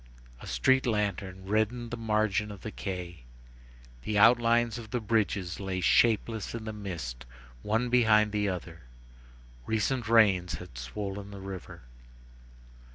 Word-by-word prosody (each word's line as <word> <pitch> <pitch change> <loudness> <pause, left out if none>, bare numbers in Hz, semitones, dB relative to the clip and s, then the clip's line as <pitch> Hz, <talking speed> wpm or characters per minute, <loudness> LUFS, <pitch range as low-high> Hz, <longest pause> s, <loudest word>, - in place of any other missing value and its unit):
A - - -10
street 130 - +2
lantern 100 -3 -2
reddened 110 +4 0
the - - -2
margin 110 -2 0
of 100 -2 -9
the 110 - -6
quay. 90 -8 -6 0.8
The 105 +11 -2
outlines 120 0 +4
of 110 -2 -10
the 125 - -1
bridges 105 -5 -1
lay 95 -2 -3
shapeless 110 +4 +2
in 115 -1 -6
the 110 - -4
mist 85 - -6 0.4
one 115 +4 0
behind 110 -3 +4
the 105 -1 0
other. 90 -2 -6 0.9
Recent 115 +1 0
rains 95 -7 +4
had 90 -3 -10
swollen 100 +12 -5
the 100 -1 -9
river. 95 -7 -8
105 Hz, 135 wpm, -29 LUFS, 95-115 Hz, 0.9 s, outlines